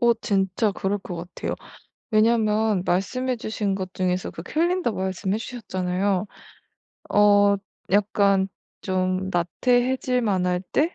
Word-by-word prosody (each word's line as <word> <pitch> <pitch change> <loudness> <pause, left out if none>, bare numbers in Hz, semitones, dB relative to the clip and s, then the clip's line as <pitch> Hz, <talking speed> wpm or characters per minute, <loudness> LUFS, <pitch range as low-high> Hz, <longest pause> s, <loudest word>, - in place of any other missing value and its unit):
어 235 -1 +5
진짜 200 -1 0
그럴 200 +2 -1
것 180 -2 -7
같아요. 175 +2 -5 0.6
왜냐하면 215 -3 +3
말씀해 255 +8 0
주신 215 -3 -2
것 185 -1 -5
중에서 185 -1 -1
그 165 - -8
캘린더 340 - 0
말씀해 190 +1 -2
주셨잖아요. 190 -4 -2 0.9
어 205 -1 +5 0.3
약간 200 -1 +3 0.3
좀 185 0 -1
나태해질만할 215 -1 +1
때 320 +5 +2
200 Hz, 245 characters per minute, -24 LUFS, 185-225 Hz, 0.9 s, 어